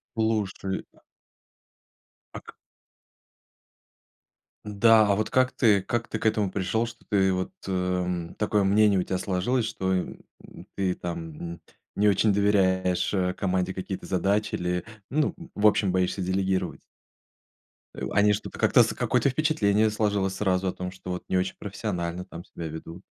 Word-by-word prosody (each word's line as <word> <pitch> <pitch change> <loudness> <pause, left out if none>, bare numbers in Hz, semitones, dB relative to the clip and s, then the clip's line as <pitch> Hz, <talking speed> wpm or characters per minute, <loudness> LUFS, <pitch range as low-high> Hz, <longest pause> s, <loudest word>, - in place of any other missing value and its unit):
Слушай. 105 -3 -1 1.5
А - - -6
ка - - -14 2.1
Да, 110 +1 +5
а - - +3
вот 110 +1 -1
как 130 0 +2
ты 105 -6 +3
как 120 +1 -2
ты 110 - -3
к - - -7
этому 105 -3 +2
пришел, 105 +5 -1
что 115 0 -12
ты 95 -2 +3
вот, 95 0 -3 0.2
эм, 90 -2 -1
такое 105 -1 +1
мнение 100 0 +4
у - - +2
тебя 95 0 -2
сложилось, 105 +7 0
что, 95 0 -2
м, 90 - -2 0.6
ты 95 -2 0
там 85 0 -6 0.4
не 105 +1 +4
очень 100 +1 +3
доверяешь, 95 -3 +2
э, 90 -2 0
команде 95 -1 -1
какие-то 95 0 -5
задачи 100 +3 0
или, 90 +2 -1 0.3
ну, 150 +1 +1 0.2
в 105 +1 +2
общем, 100 -3 +3
боишься 95 +1 0
делегировать? 95 +1 -1 1.1
Э, - - -5
они 105 0 +4
что-то 100 - -5
как-то - - +5
какое-то 140 - +1
впечатление 110 -8 +2
сложилось 100 -3 0
сразу 95 -2 +1
о - - -1
том, 90 0 -5
что, 95 -1 -9
вот, 90 - -5
не 95 - 0
очень 95 +1 -2
профессионально 90 -4 -4
там 85 +1 -10
себя 85 - -8
ведут. 80 +3 -9
95 Hz, 150 wpm, -26 LUFS, 90-105 Hz, 2.1 s, Да